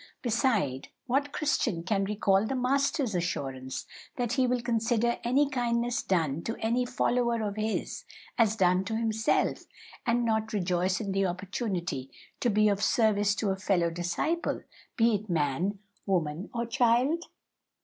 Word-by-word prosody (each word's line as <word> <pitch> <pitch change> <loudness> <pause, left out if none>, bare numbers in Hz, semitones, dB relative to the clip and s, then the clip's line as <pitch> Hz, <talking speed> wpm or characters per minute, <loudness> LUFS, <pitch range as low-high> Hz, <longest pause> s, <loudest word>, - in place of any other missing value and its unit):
Beside, 215 - +1 0.2
what 275 +3 0
Christian 235 - 0
can 195 +2 0
recall 200 -1 +2
the 270 - -2
Master's 275 0 +1
assurance 135 -7 -3 0.3
that 245 -2 -1
He 260 -1 +2
will 250 0 +1
consider 235 0 +1
any 270 +5 +3
kindness 240 -2 0
done 165 -5 0
to 225 - -3
any 240 +3 0
follower 240 -2 +1
of 205 -1 -2
His 215 0 -2 0.3
as 220 -2 +3
done 185 -2 +3
to 220 +3 -2
Himself, 220 -1 0 0.4
and 240 0 +1
not 220 0 0
rejoice 185 -1 +1
in 200 -2 -3
the 195 0 +1
opportunity 180 - -3 0.3
to 245 - +1
be 215 0 +4
of 200 -1 +1
service 205 -2 +3
to 210 -3 0
a - - 0
fellow 185 -3 +1
disciple, 175 - -1 0.3
be 230 0 +4
it 210 0 -2
man, 165 +5 0 0.3
woman, 170 -2 -1
or 235 0 -2
child?" 250 +7 +2
215 Hz, 150 wpm, -29 LUFS, 185-240 Hz, 0.4 s, be